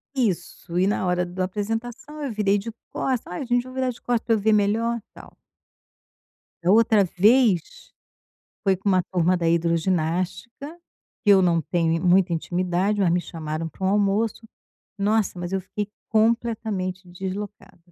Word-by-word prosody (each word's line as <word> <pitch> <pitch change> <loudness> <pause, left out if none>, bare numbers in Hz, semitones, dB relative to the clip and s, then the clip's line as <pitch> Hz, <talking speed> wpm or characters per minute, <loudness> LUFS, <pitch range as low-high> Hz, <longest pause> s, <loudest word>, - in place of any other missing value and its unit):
Isso, 180 -6 -2
e 185 - +3
na 195 -2 0
hora 180 0 +1
da 185 +1 -2
apresentação 225 +9 -5
eu 270 - -2
virei 205 -1 +1
de 230 +3 -6 0.2
costa: 255 -8 -2
"Ai 215 +9 -4
gente 245 0 +2
vou 255 0 -11
virar 260 -1 0
de 245 - -6
costa 240 -2 -1
pra 225 - +2
eu - - -1
ver 220 +1 +3
melhor", 225 +3 +1
tal. - - -14 1.3
Da 180 - +3
outra 220 -2 +5
vez, 205 0 +2 0.7
foi 195 -2 +2
com 200 +2 -3
uma 185 -2 +3
turma 180 0 +3
da 170 -2 0
hidroginástica 180 - -1 0.5
que 205 - +5
eu 190 -1 +6
não 170 -2 +3
tenho 165 +1 0
muita 180 0 +4
intimidade, 180 +4 0
mas 185 -4 +3
me 175 - +2
chamaram 160 -1 -5
pra 190 +5 -8
um - - +3
almoço 210 +3 +1 0.5
Nossa, 205 -2 +1
mas 175 +1 -5
eu 190 - 0
fiquei 205 +3 -5 0.2
completamente 215 -5 0
deslocada. 190 +3 -7
195 Hz, 160 wpm, -24 LUFS, 180-225 Hz, 1.3 s, eu